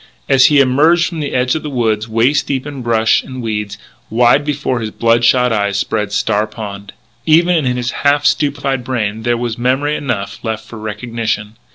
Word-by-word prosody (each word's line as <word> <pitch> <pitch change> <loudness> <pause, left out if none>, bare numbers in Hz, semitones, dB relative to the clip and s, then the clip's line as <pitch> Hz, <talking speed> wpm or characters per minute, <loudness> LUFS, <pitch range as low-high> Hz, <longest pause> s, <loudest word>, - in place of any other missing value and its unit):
As 135 -1 +5
he 145 -2 +4
emerged 150 +6 +4
from 165 -2 -5
the 145 -2 -3
edge 125 0 +1
of 160 - -2
the 150 - -5
woods, 110 -4 -1
waist 115 +6 +1
deep 135 -2 -2
in 145 -3 -7
brush 115 -2 +2
and 130 -1 -9
weeds, 105 -3 -4 0.3
wide 120 +5 +3
before 145 -4 -2
his 110 -1 -4
blood 115 +1 +1
shot 125 0 +3
eyes 100 -2 0
spread 105 0 -2
Star 105 +1 0
Pond. 100 -3 -8 0.3
Even 165 -2 +3
in 125 0 0
his 120 -1 -2
half 145 0 +2
stupefied 140 -3 0
brain 110 -4 -2
there 120 +1 0
was 120 -1 -4
memory 135 +5 0
enough 120 -10 -4
left 110 -1 -4
for 115 - -10
recognition. 110 0 -4
120 Hz, 190 wpm, -16 LUFS, 110-140 Hz, 0.3 s, As